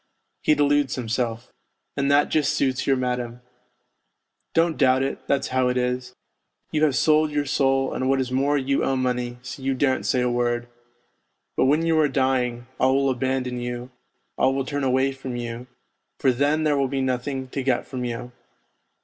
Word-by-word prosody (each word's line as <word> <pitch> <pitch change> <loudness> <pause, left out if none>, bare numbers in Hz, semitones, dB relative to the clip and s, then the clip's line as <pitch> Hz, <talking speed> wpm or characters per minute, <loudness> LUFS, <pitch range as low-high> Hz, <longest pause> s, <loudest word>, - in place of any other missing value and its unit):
He 155 - +3
deludes 145 -2 +2
himself. 120 -1 -3 0.4
And 140 0 0
that 145 +1 +4
just 150 -1 +1
suits 130 -3 0
your 135 - +4
madam. 125 -1 -3 1.1
Don't 165 -1 +3
doubt 130 -1 +3
it, 135 - -2
that's 140 -1 0
how 130 0 +2
it 125 0 0
is; 125 0 -2 0.6
you 155 0 +1
have 140 -4 +1
sold 155 +4 +3
your 145 -1 -1
soul, 135 -2 +1
and 130 - -1
what 135 0 +2
is 130 -1 -2
more 140 +3 +2
you 135 0 0
owe 135 - +1
money, 125 -1 -1
so 130 +2 -8
you 135 0 0
daren't 130 0 +1
say 125 - +2
a 125 - +1
word. 120 0 0 0.9
But - - +3
when 150 +5 +3
you 165 -1 +3
are 150 - +4
dying, 130 -3 0
all 130 +1 +3
will 135 0 +2
abandon 130 -1 -1
you, 120 +1 -5 0.5
all 135 +1 +3
will 135 -1 -1
turn 145 0 -3
away 130 +1 +2
from 135 -2 -6
you, 120 +1 -5 0.5
for 135 - +3
then 145 +5 +1
there 150 -2 +2
will 135 - +2
be 135 +1 -2
nothing 130 +1 -2
to 135 - -3
get 130 -2 0
from 130 -2 -5
you. 120 0 -5
130 Hz, 185 wpm, -24 LUFS, 125-140 Hz, 1.1 s, that